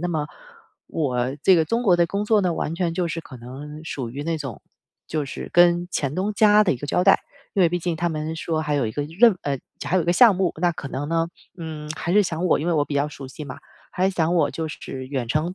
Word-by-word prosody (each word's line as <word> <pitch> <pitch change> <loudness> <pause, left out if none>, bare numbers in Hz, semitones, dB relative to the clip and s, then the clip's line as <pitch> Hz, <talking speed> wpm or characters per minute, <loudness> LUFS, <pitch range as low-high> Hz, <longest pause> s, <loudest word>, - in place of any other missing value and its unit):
那 175 - -1
么 155 -4 -1 0.6
我 130 -3 -1
这 190 - +7
个 160 -2 +3
中 230 +9 0
国 190 -5 +5
的 170 -1 +3
工 200 +3 -1
作 215 0 +3
呢 180 -3 +1
完 160 - -2
全 170 -1 -1
就 175 0 0
是 165 0 -3
可 130 - -12
能 145 +6 -9
属 130 -6 -4
于 140 +4 -5
那 165 0 -1
种， 135 -7 -6 0.5
就 155 -2 -2
是 135 - -7
跟 175 0 +5
前 140 -2 -1
东 195 +3 0
家 210 -1 +6
的 185 - +3
一 - - -3
个 145 - -6
交 180 - +2
代。 195 - +6 0.3
因 195 - +3
为 170 - +5
毕 175 - 0
竟 175 0 -2
他 175 +2 0
们 155 0 -3
说 160 -1 -1
还 150 -1 -1
有 140 -3 +1
一 - - -2
个 145 - -2
任 195 +9 +4
呃， 140 -2 -1 0.3
还 185 - +1
有 180 - +3
一 - - -5
个 170 - +2
项 225 +3 +7
目， 185 -2 +1
那 175 +1 +2
可 150 -4 -7
能 140 +2 -4
呢， 165 0 +1 0.3
嗯， 160 -3 -7
还 175 - -2
是 210 +2 +6
想 165 -1 -2
我 - - +3
因 155 - -3
为 175 - +2
我 145 -2 +2
比 145 - -5
较 140 +1 +2
熟 140 -2 -9
悉 150 +3 -8
嘛， 135 - -8 0.3
还 190 +1 +1
想 170 -2 +1
我 170 - +3
就 160 - -4
是 130 -3 -7
远 130 -3 -3
程 155 +8 0
165 Hz, 290 characters per minute, -23 LUFS, 145-180 Hz, 0.6 s, 这